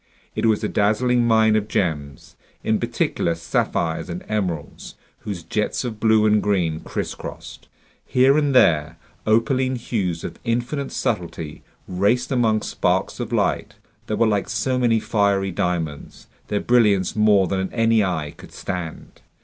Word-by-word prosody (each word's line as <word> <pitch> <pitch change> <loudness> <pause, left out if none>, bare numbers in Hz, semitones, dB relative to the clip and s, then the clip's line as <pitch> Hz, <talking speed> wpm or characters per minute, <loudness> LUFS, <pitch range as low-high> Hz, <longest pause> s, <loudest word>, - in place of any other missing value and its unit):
It - - 0
was 110 -2 +2
a - - +1
dazzling 120 +4 +2
mine 110 -1 +4
of 105 -1 0
gems, 75 -9 -3 0.3
in - - +1
particular 85 - -1
sapphires 85 +1 -1
and 85 +1 -5
emeralds, 90 -8 -4 0.2
whose 95 -5 -6
jets 105 +10 -1
of 115 -4 -5
blue 110 -1 +4
and 105 -1 +4
green 85 -6 0
crisscrossed. - - -7 0.4
Here 130 +2 +4
and 145 -3 +1
there, 80 -8 +4 0.3
opaline 130 +4 +2
hues 100 -9 -2
of 85 - -7
infinite 120 +4 -2
subtlety 85 -7 -3 0.3
raced 105 +8 +1
among 115 -4 +2
sparks - - -1
of - - -4
light - - 0 0.3
that 105 - -1
were 115 - +4
like 105 -3 0
so 125 +4 0
many 115 -2 +3
fiery 100 -3 +1
diamonds, 85 -4 -3 0.2
their 105 - -1
brilliance 105 -6 +3
more 105 -3 +4
than 95 +1 -2
any 115 -2 +3
eye 80 -6 -2
could - - -14
stand. 90 -4 -6
105 Hz, 145 wpm, -22 LUFS, 90-115 Hz, 0.4 s, mine